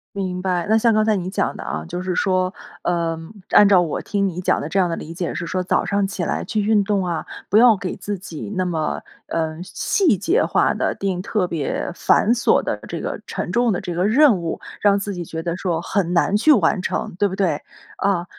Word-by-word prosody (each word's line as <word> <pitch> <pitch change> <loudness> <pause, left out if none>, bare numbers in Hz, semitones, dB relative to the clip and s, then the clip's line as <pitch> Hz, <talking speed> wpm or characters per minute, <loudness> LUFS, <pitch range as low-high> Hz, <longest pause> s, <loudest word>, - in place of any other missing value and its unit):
明 185 -2 -3
白， 180 -2 0
那 220 - +3
像 230 +1 +3
刚 215 0 +3
才 215 -1 +3
你 185 -1 -3
讲 - - -1
的 - - -7
啊， 75 +1 -4
就 180 - -4
是 185 -1 -2
说， 185 -1 +1 0.3
呃， 170 -2 0 0.3
按 205 -1 +7
照 190 -3 +6
我 165 - -2
听 200 -1 0
你 180 0 -4
讲 - - +1
的 150 - -4
这 195 +4 0
样 180 -2 +2
的 165 - -1
理 165 - -8
解 175 0 -3
是 175 - -3
说， 185 +2 -2
早 - - +1
上 200 +1 +1
起 190 -3 -4
来 - - -1
去 215 -2 -1
运 210 -1 +3
动 195 -2 0
啊， 170 -2 -3 0.2
不 205 - +3
要 230 -3 +7
给 185 -1 -4
自 205 -1 -4
己 175 +2 -8
那 185 0 0
么， 160 -3 -2 0.2
嗯， 160 0 -2
细 290 - +1
节 365 - +2
化 - - +2
的， - - -1
定 190 -2 -2
特 195 -2 -1
别 160 +1 -3
繁 220 +5 +3
琐 240 - +2
的 - - -2
这 - - -5
个 - - -4
沉 - - -4
重 240 -1 +2
的 180 - -1
这 175 - -4
个 180 +3 0
任 255 -2 +5
务， 165 - -3 0.2
让 200 -1 +4
自 200 0 -3
己 175 -1 -5
觉 160 0 -6
得 170 0 -2
说 175 -3 -1
很 180 0 -1
难 195 +4 +2
去 300 +9 +5
完 185 -3 +2
成， - - -3
对 205 - +4
不 190 - -5
对？ 175 -7 0 0.4
啊， 190 -3 0
185 Hz, 255 characters per minute, -21 LUFS, 175-205 Hz, 0.4 s, 按